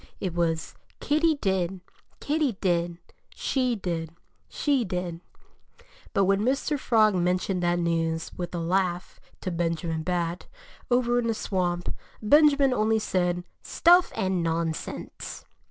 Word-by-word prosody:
It 185 -4 -3
was 165 -2 -1 0.3
Kitty 310 +2 +2
did, 190 -6 -1 0.4
Kitty 295 -3 0
did; 175 -3 0 0.4
she 255 -3 0
did, 170 -5 -3 0.4
she 280 -4 +1
did! 180 -3 -4 0.9
But 195 - +2
when 195 +1 +2
Mr. 275 +5 0
Frog 220 -4 +4
mentioned 180 +1 0
that 175 0 +2
news, 165 -1 -1
with 175 0 -5
a - - -2
laugh, 180 +1 -1 0.2
to 185 - -3
Benjamin 165 -1 -1
Bat, 175 0 -2 0.4
over 245 -1 +2
in 235 - -1
the 225 - 0
swamp, 175 -4 -1 0.3
Benjamin 280 +2 +5
only 220 -1 +2
said, 180 -4 0 0.2
"Stuff 350 +2 +4
and 185 -2 0
nonsense!" 165 -1 -4
185 Hz, 125 wpm, -26 LUFS, 170-235 Hz, 0.9 s, Benjamin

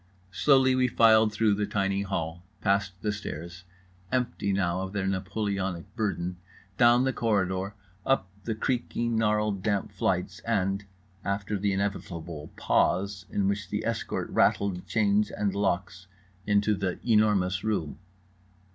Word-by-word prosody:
Slowly 130 +5 +4
we 130 0 +3
filed 110 -2 +5
through 105 0 +2
the 105 0 -1
tiny 100 -1 0
hall, 85 -4 -3 0.2
past 100 -1 +1
the 105 - +1
stairs 85 -3 -7 0.5
(empty 125 -5 0
now 90 -2 0
of 95 +1 -5
their 100 -2 -1
Napoleonic 95 -1 -2
burden), 90 -4 -2 0.4
down 120 +2 +5
the 130 0 +1
corridor, 100 -3 0 0.3
up 135 -9 +1 0.2
the 115 - -1
creaking 120 0 -1
gnarled 105 -2 +1
damp 100 0 -1
flights, - - -1
and 95 +2 -1 0.4
(after 100 +1 -2
the 100 0 0
inevitable 85 -5 -4
pause 95 -1 +1
in 100 -1 0
which 100 -1 -2
the - - -2
escort - - -2
rattled 95 -3 +2
chains 105 -1 +2
and 100 -2 -1
locks) 95 -2 -1 0.4
into 105 +1 +3
The 95 -3 -2
Enormous 105 -5 +3
Room. 85 -9 -2
100 Hz, 135 wpm, -28 LUFS, 95-105 Hz, 0.5 s, filed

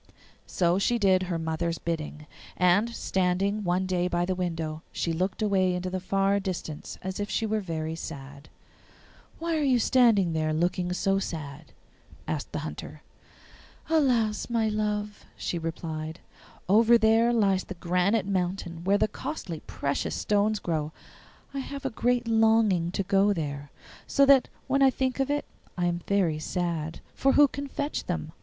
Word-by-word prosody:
So 175 +1 +1
she 240 +4 +2
did 190 -4 +3
her 180 -2 -2
mother's 165 +1 -2
bidding, 155 -2 -4 0.3
and, 180 +5 +4
standing 195 -1 0
one 180 +1 +1
day 180 -1 0
by 175 -1 0
the 185 - 0
window, 165 -4 -3
she 165 - -2
looked 185 +5 -1
away 190 -3 +2
into 180 +1 -3
the 185 - -2
far 195 +2 +1
distance 180 -6 -5
as 190 +1 -4
if 205 0 -3
she 225 - 0
were 220 0 0
very 160 -4 -3
sad. 145 -3 -8 0.9
'Why 335 0 -1
are - - 0
you 265 -4 +3
standing 225 -8 +4
there 155 -1 0
looking 175 +2 0
so 195 +2 +1
sad?' 155 -5 -6 0.6
asked - - -3
the - - -3
Hunter. - - -8 0.9
'Alas, 245 -10 +2
my 230 -2 +1
love,' 210 -1 -2
she 175 - -3
replied, 160 0 -5 0.5
'over 225 +4 +6
there 225 +1 +4
lies 195 -5 +2
the 190 - -7
granite 180 +4 +1
mountain 180 -3 -2
where 195 +2 +3
the - - +2
costly 195 - -5
precious 140 0 -2
stones 210 +1 +1
grow. 155 -5 -2 0.6
I 275 - -3
have 275 +1 -6
a 270 - -1
great 245 +1 0
longing 220 -6 +3
to 195 - 0
go 195 +2 +3
there, 145 -4 -4 0.4
so 280 - +4
that 275 -2 +6 0.2
when 275 +1 +1
I 270 - +7
think 260 0 -1
of 270 0 +1
it 290 0 0 0.3
I 175 - +1
am 175 0 -1
very 180 -6 +1
sad. 165 -1 -3
For 270 - +2
who 290 0 +7
can 280 +1 -6
fetch 285 +2 -3
them? - - -3
190 Hz, 165 wpm, -27 LUFS, 170-220 Hz, 0.9 s, I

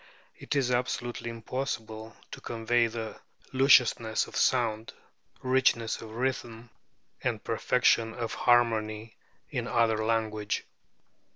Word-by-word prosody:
It - - -5
is 130 -3 +1
absolutely 120 -1 -2
impossible 115 -2 -5
to - - -8
convey 115 +1 +1
the 115 -1 -6 0.3
lusciousness 125 -4 +4
of - - -12
sound, 115 -3 +1 0.5
richness 130 -3 +2
of 110 -1 -10
rhythm, 120 -2 -3 0.5
and - - -1
perfection 115 -1 +2
of 115 -2 -4
harmony 110 -2 +1 0.4
in - - -3
another 110 -2 +2
language." 110 -2 -1
115 Hz, 105 wpm, -28 LUFS, 110-120 Hz, 0.5 s, lusciousness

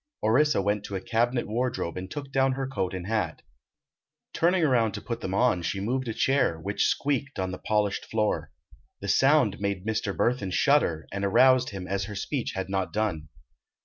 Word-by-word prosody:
Orissa 130 0 +3
went 105 +1 0
to 100 - -5
a - - -1
cabinet 120 +4 0
wardrobe 120 -5 -2
and 95 +1 -6
took 140 -2 -7
down 135 0 +2
her 135 0 -3
coat 95 -8 -3
and 90 -1 -5
hat. 110 -1 -2 0.9
Turning 175 +1 +2
around 120 -7 +2
to - - -4
put 115 +2 -5
them 95 0 -3
on 120 -5 +2
she 95 +3 -2
moved 125 +6 -2
a 115 - -2
chair, 130 -13 +2
which 100 +5 0
squeaked 140 -1 -1
on 95 -1 -2
the 90 - -6
polished 105 -2 0
floor. 110 -1 -1 0.5
The 100 - -6
sound 130 +1 +3
made 100 -1 -2
Mr. 110 -2 -2
Burthon 110 -6 0
shudder, 90 - +2
and 100 +1 -3
aroused 130 +6 +4
him 95 -2 -6
as 100 0 -1
her 105 0 -7
speech 125 +5 -3
had 95 -1 -3
not 95 -1 -2
done. 95 -8 -2
110 Hz, 190 wpm, -27 LUFS, 95-130 Hz, 0.9 s, aroused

